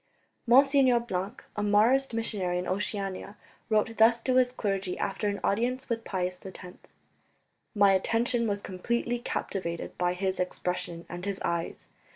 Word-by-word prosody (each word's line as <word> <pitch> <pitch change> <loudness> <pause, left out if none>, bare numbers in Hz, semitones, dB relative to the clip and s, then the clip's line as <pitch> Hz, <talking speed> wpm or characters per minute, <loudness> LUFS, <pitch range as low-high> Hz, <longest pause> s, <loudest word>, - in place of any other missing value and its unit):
Monsignor 265 0 +6
Blanc, 205 +1 -4
a 210 - -2
Marist 225 +7 +3
missionary 205 -6 -1
in 180 - -3
Oceania, 200 0 -3 0.3
wrote 220 +1 +1
thus 230 +1 +5
to 255 - 0
his 250 -1 +4
clergy 195 -6 -2
after 200 +2 -2
an 200 0 -1
audience 250 +6 0
with 230 -1 -2
Pius 180 -3 -3
X: 185 -1 -9 1.0
"My 200 -1 +6
attention 230 +4 +1
was 205 -1 -2
completely 235 +6 -2
captivated 170 -7 -4
by 180 0 +2
his 190 0 -1
expression 180 -2 -3
and 175 +1 -7
his 200 -1 -3
eyes. 170 -1 -3
205 Hz, 145 wpm, -28 LUFS, 185-235 Hz, 1.0 s, Monsignor